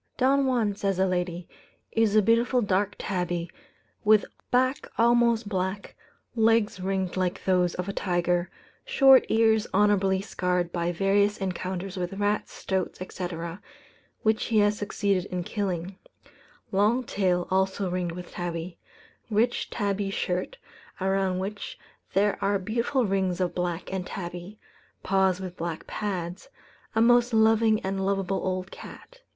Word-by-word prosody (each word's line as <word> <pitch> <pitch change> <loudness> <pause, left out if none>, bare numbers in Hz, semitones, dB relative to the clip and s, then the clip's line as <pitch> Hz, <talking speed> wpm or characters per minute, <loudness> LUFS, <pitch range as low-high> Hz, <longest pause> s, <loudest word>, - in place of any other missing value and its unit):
"Don 270 +1 +3
Juan," 235 -5 +1
says 195 -1 -1
a 190 - +3
lady, 180 -2 -2 0.4
"is 225 -2 +2
a 215 - +6
beautiful 235 +3 +3
dark 205 +1 0
tabby, 175 -2 -2 0.5
with 215 -1 +5 0.2
back 255 +2 +1
almost 235 -1 +3
black, 190 0 -3 0.4
legs 225 -3 +3
ringed 190 -1 -2
like 185 0 -1
those 180 -2 +2
of 180 +1 -4
a 200 - -3
tiger, 175 -1 0 0.3
short 270 - +6
ears 220 -1 +3
honourably 195 -2 +3
scarred 180 -3 -1
by 170 0 -1
various 200 +3 +2
encounters 190 0 -4
with 180 0 -3
rats, 205 +1 -1
stoats, 190 -2 -3
etc., 175 -1 -5 0.6
which 220 0 +2
he 225 - +1
has 205 0 +4
succeeded 200 -2 -1
in 180 -1 -4
killing; 185 -1 -3 0.7
long 210 +6 +2
tail, 185 -5 0
also 190 +1 +1
ringed 180 -1 -2
with 175 0 -8
tabby; 170 0 -5 0.5
rich 225 +3 +1
tabby 200 -2 -1
shirt, 185 - -2 0.4
around 190 -1 +1
which 200 +2 -5 0.4
there 205 +1 +2
are 200 0 +2
beautiful 235 +6 0
rings 190 -2 0
of 180 -1 0
black 175 +1 -3
and 185 -1 -3
tabby; 180 +2 -7 0.5
paws 190 -1 +2
with 185 -2 -6
black 170 -2 -5
pads 185 +1 -4 0.5
a 225 - +3
most 240 0 +4
loving 220 0 +4
and 195 0 -2
lovable 195 0 0
old 185 0 -2
cat. - - -12
195 Hz, 140 wpm, -27 LUFS, 180-215 Hz, 0.7 s, a